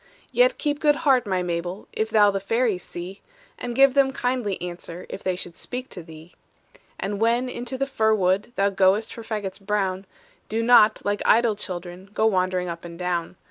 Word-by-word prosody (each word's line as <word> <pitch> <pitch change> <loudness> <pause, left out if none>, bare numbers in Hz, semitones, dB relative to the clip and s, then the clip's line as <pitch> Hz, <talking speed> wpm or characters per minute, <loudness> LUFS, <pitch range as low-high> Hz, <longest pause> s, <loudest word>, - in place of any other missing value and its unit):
"Yet - - +3
keep 295 -1 -1
good 295 -1 +4
heart, 255 -5 +4
my 185 -2 0
Mabel, 175 +3 -4
If 220 0 -1
thou 210 -2 +5
the 195 - -2
fairies 215 -1 0
see, 180 +3 -8 0.4
And 240 -1 -4
give 270 0 +6
them 275 -1 +4
kindly 245 -6 -1
answer 175 0 -7
If 195 - -7
they 185 -1 -1
should 175 -1 -6
speak 255 +1 -6
to 180 - -8
thee. 160 +1 -13 0.7
"And 200 0 -3
when 235 +3 +2
into 245 +1 -5
the 275 - 0
fir 220 -5 +2
wood 190 +2 +1
Thou 200 0 +2
goest 195 +3 +2
for 230 - -8
fagots 210 -3 -5
brown, 195 -2 -1 0.4
Do 225 +1 -1
not, 225 -2 +5
like 205 0 0
idle 230 -1 +4
children, 185 -1 -7
Go 220 - +2
wandering 185 -3 +1
up 170 -1 -6
and 170 -1 -9
down. 180 -1 -2
205 Hz, 190 wpm, -24 LUFS, 180-235 Hz, 0.7 s, give